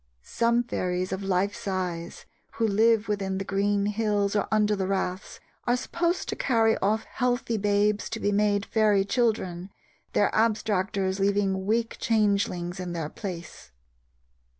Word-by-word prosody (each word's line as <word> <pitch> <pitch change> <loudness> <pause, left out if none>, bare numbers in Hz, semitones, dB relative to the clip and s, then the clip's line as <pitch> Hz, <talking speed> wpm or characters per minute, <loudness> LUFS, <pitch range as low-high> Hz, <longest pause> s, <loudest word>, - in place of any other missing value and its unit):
Some 235 - +1
fairies 185 -5 -2
of 190 +1 -3
life 195 +1 0
size, 185 -6 -4 0.3
who 230 - 0
live 220 +1 +3
within 195 -2 -1
the 195 - -3
green 200 +1 +1
hills 210 -1 0
or 205 - +1
under 210 -1 +3
the 190 -2 -2
raths, 190 0 -3 0.3
are 245 +1 +3
supposed 340 +7 -1
to - - -2
carry 225 -3 +2
off 215 +3 +1
healthy 245 -1 -1
babes 205 0 +1
to 225 - -4
be 205 - 0
made 205 0 +2
fairy 210 -3 +2
children, 200 -6 -1 0.4
their - - +3
abstractors 200 -3 0
leaving 195 -1 +1
weak 225 +2 0
changelings 200 -5 0
in 180 -1 -4
their 160 -3 -3
place. 170 - -8
205 Hz, 145 wpm, -26 LUFS, 190-220 Hz, 0.4 s, live